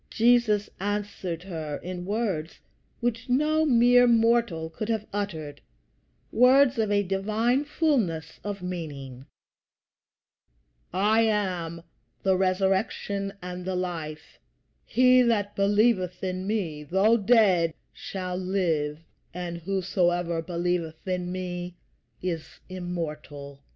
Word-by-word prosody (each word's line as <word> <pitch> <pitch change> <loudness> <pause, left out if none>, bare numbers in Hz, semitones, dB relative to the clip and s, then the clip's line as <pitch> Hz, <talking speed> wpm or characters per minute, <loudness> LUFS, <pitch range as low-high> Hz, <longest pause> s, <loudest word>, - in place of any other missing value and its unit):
Jesus 225 -3 +3
answered 200 -4 -3
her 160 -6 -5
in 180 0 -6
words 200 -7 -2 0.4
which 240 +1 -2
no 305 +4 +2
mere 245 -1 +6
mortal 230 -8 +2
could 215 +7 -5
have 220 -2 -1
uttered 160 -8 -4 0.7
words 255 +1 +5
of 215 -2 +1
a 205 0 +3
divine 215 +8 0
fullness 255 - 0
of 200 -2 -5
meaning 140 -7 -6 1.6
"I 210 +5 +3
am 180 -7 -1 0.4
the 190 -1 +3
Resurrection 195 +1 0
and 180 0 -6
the 185 0 -2
Life: 165 -4 -5 0.5
he 255 0 +5
that 210 -4 +1
believeth 200 -2 +2
in 185 0 -3
me, 180 -9 -2
though 190 +9 +3
dead, 195 -7 +3 0.2
shall 185 -2 -5
live, 170 -6 0 0.4
and 175 -1 -4
whosoever 175 -2 0
believeth 170 -1 -3
in 180 -1 -2
me 180 -1 -5 0.5
is 170 -4 -4
immortal." 155 -6 -6
190 Hz, 105 wpm, -26 LUFS, 170-220 Hz, 1.6 s, mere